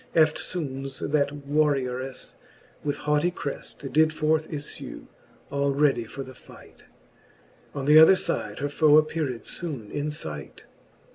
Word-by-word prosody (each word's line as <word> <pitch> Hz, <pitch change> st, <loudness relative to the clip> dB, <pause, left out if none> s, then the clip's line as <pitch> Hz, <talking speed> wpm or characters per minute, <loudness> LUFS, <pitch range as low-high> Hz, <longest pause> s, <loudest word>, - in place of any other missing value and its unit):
Eftfoones 145 Hz, -4 st, 0 dB
that 145 Hz, -1 st, 0 dB
warriourefle 135 Hz, -3 st, 0 dB, 0.5 s
with 145 Hz, -1 st, -1 dB
haughty 150 Hz, +3 st, +3 dB
creft 140 Hz, -4 st, -6 dB
Did 155 Hz, +1 st, +5 dB
forth 155 Hz, 0 st, 0 dB
iflue, 145 Hz, -2 st, -6 dB, 0.5 s
all 140 Hz, -1 st, 0 dB
ready 135 Hz, -5 st, +2 dB
for 135 Hz, +4 st, -7 dB
the 130 Hz, -, -11 dB
fight: -, -, -16 dB, 0.9 s
On 140 Hz, -2 st, -3 dB
th'other 155 Hz, +5 st, +8 dB
fide 105 Hz, -, -2 dB
her 145 Hz, -, -2 dB
foe 150 Hz, 0 st, +5 dB
appeared 155 Hz, -5 st, 0 dB
foone 135 Hz, -12 st, -5 dB
in 145 Hz, +1 st, -2 dB
fight, 80 Hz, -, -7 dB
XXVIII. -, -, -27 dB
145 Hz, 130 wpm, -26 LUFS, 135-155 Hz, 0.9 s, th'other